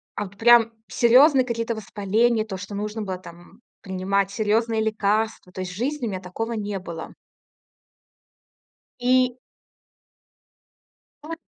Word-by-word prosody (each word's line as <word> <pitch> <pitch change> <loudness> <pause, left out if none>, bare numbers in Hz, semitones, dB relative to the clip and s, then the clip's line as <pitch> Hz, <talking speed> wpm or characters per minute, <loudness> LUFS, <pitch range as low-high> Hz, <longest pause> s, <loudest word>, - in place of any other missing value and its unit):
а 205 - -3
вот 200 +1 -14
прям 230 0 +5
серьезные 260 +3 +5
какие-то 230 -1 -2
воспаления, 220 +2 +1
то 195 -3 -6
что 200 +2 -8
нужно 210 +2 -4
было 190 -3 -4
там 175 +4 -15 0.2
принимать 190 +1 -1
серьезные 220 +1 +1
лекарства. 215 -2 -1
То 185 - -5
есть 185 -1 -5
в - - -9
жизни 260 +5 -2
у - - -2
меня 190 -2 -4
такого 210 +5 -5
не 205 -3 -3
было. 170 -3 -8 1.9
И 255 0 +2 1.9
Ну 305 - -10
вот 330 - -5
215 Hz, 135 wpm, -24 LUFS, 195-235 Hz, 1.9 s, прям